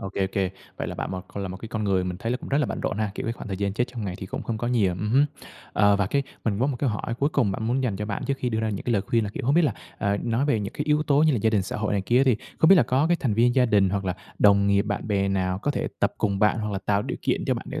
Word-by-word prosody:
ô 95 - -4
kê, 95 - +1
ô - - 0
kê. 95 -2 0 0.3
Vậy - - -3
là - - -5
bạn - - -4
một 95 - -4
còn 100 - -6
là 95 - -3
một 95 - -6
cái 110 - -9
con 110 -1 -3
người 95 -2 +1
mình 90 -1 -3
thấy 115 +4 -1
cũng - - -8
rất 140 - +2
là 145 - +2
bận - - -4
rộn 100 - -2
ha? 105 -2 0
Kiểu, - - -5
cái 115 - 0
khoảng - - -9
thời 95 - -3
gian 100 0 -1
chết 120 +4 +1
trong 120 -4 -6
ngày 90 -2 -3
thì 95 - -6
cũng - - -5
không 110 -2 -3
có 120 - -2
nhiều, 105 -7 +2
ừm 100 +4 -3
hứm. 140 +4 +5 0.5
Ờ, 100 -1 +4
và 100 -2 +1
cái 140 +6 +1 0.2
mình 105 -3 0
có 130 - +3
một 135 -3 -1
cái 130 -3 0
hỏi 105 +2 -3
cuối 140 - +2
cùng 120 -10 +1
bạn 110 - -4
muốn 130 +3 +1
dành 110 -6 -1
cho 105 +1 -4
bạn 100 - -3
trước 140 - 0
khi 125 - -1
đưa 110 -1 -1
ra 110 - 0
những 100 - -5
cái 120 - 0
lời 100 -3 +2
khuyên 115 +1 +1
là, 100 - -4
kiểu, - - -6
không 140 - +3
biết 175 - +5
là, 150 - +2 0.3
ờ, 100 -1 +1
nói 115 +3 0
về 120 -7 +1
những 100 +1 -4
cái 150 - -3
yếu 150 0 +2
tố 145 0 +3
như 155 -2 +4
là 120 - +1
gia 110 - +3
đình, 105 -4 +2
xã - - -5
hội 105 0 -1
này 100 - +1
kia 120 +6 +2
á, - - +5
thì 120 -5 +4 0.2
không 160 - +5
biết 195 - +9
là 150 - +6
có 135 +5 +2
cái 175 0 +3
thành 115 -6 0
viên 120 +2 +3
gia 125 -2 +4
đình 100 -4 +3
hoặc 100 -1 -1
là 90 -1 -1 0.2
đồng 100 -1 +5
nghiệp, 100 0 +3
bạn 105 +1 -3
bè 100 -1 +1
nào 95 -1 0
có 145 - -1
thể - - -2
tập - - +1
cùng 100 -2 0
bạn 105 +1 +3
hoặc 105 -1 -3
là 95 - -1
tạo 100 +1 0
điều - - -4
kiện - - 0
cho - - +1
bạn - - -6
để - - -4
105 Hz, 375 wpm, -25 LUFS, 100-125 Hz, 0.5 s, biết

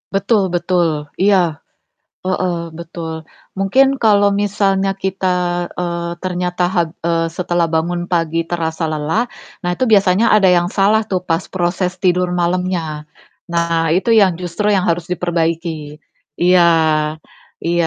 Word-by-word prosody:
Betul 195 0 +2
betul, 170 -3 0 0.2
iya, 180 -6 +2 0.7
heeh, 185 -1 0 0.2
betul. 165 -1 -6 0.3
Mungkin 260 +8 +3
kalau 205 -2 +4
misalnya 195 -1 +1
kita, 190 0 -2 0.5
eee, 170 -1 -3
ternyata, 180 0 -2
hab 175 -2 0 0.2
eee, 165 -1 0
setelah 175 -1 -1
bangun 175 +2 -1
pagi 165 -1 0
terasa 160 -1 -2
lelah. 155 +8 0 0.4
Nah, 175 - -1
itu 255 - 0
biasanya 205 0 +4
ada 195 -3 +5
yang 175 -1 +3
salah 205 +3 +2
tuh 185 -1 0
pas 170 0 -1
proses 180 0 -1
tidur 180 -1 +1
malamnya. 175 -3 -1 0.4
Nah, 170 -1 0
itu 195 +6 +1
yang 200 -5 +5
justru 180 +4 -4
yang 190 - +2
harus 170 0 -2
diperbaiki. 165 -3 -2 0.4
Iya, 180 0 +5 1.0
iya 170 0 +2
175 Hz, 130 wpm, -17 LUFS, 165-190 Hz, 1.0 s, ada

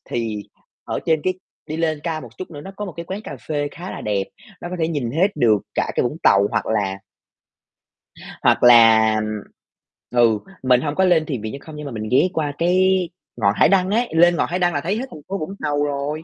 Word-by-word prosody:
Thì 110 -3 -2 0.4
ở - - -3
trên 160 -2 +2
cái 185 - 0 0.3
đi 155 - -4
lên 160 -2 -1
cao 160 -2 -3
một - - -10
chút 185 - -7
nữa 145 -3 -8
nó 190 - -9
có 210 - -4
một 190 - -7
cái 170 - -5
quán 190 +4 -5
cà - - -7
phê 145 -2 -1
khá 180 +2 -8
là - - -7
đẹp, 100 -2 -1 0.4
nó - - -6
có 180 - -4
thể 160 -1 0
nhìn 140 -8 -2
hết 165 +9 +2
được 110 -3 +4 0.2
cả - - 0
cái - - +2
Vũng 135 +5 -2
Tàu 100 0 +5
hoặc - - -1
là 100 -3 -1 1.4
hoặc - - +3
là, 115 -2 +7
ừm 110 -1 -4 0.7
ừ, 115 -3 +3 0.2
mình 125 -1 +4
hông 145 0 -2
có 190 - +2
lên 170 -4 +3
thiền 135 -8 -4
viện 110 0 -5
Chơn 140 - -8
Không, 155 - -11
nhưng 150 0 -7
mà 140 - -6
mình 110 -2 -5
ghé 135 +8 +4
qua 150 -4 -1
cái 185 +1 +2 0.3
ngọn 100 -3 +2
hải - - +4
đăng 190 -1 +3
ấy, 235 +3 +1
lên 175 +1 +5
ngọn - - 0
hải 180 +2 -1
đăng 175 -1 +2
là 145 - -1
thấy 190 +7 -1
hết 250 - -3
thành 155 - -10
phố 195 - -3
Vũng 190 +3 -5
Tàu 145 0 0
rồi, 145 +2 -3
150 Hz, 245 wpm, -21 LUFS, 115-175 Hz, 1.4 s, là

